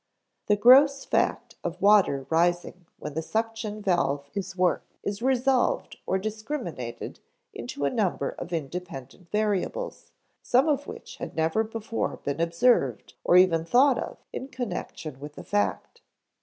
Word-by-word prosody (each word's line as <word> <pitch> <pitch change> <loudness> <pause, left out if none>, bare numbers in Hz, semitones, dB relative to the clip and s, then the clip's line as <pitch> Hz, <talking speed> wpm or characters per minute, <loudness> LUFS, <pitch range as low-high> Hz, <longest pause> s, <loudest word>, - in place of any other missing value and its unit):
The 210 - +4
gross 270 +6 +6
fact - - 0
of 175 +1 -4
water 195 -10 +4
rising 175 +1 +1
when 150 - -7
the 160 - -2
suction 220 +2 -3
valve 145 -7 0
is 195 -1 -4
worked 180 0 0
is 200 +1 -3
resolved 260 0 +1
or 190 - +2
discriminated 215 - -5 0.3
into 140 +4 -4
a 140 - +1
number 200 -6 0
of 175 - -8
independent 165 0 -6
variables, 215 - -2 0.3
some 255 +5 +3
of 285 -2 0
which - - -9
had - - -7
never 160 +7 +1
before 225 0 -3
been 140 +3 -3
observed 170 - +2
or 175 - +5
even 175 -3 +5
thought 250 +7 +4
of - - -5 0.2
in 260 - -5
connection 180 - -5
with 145 +1 -9
the - - -9
fact. 205 - -2
190 Hz, 140 wpm, -26 LUFS, 165-230 Hz, 0.3 s, gross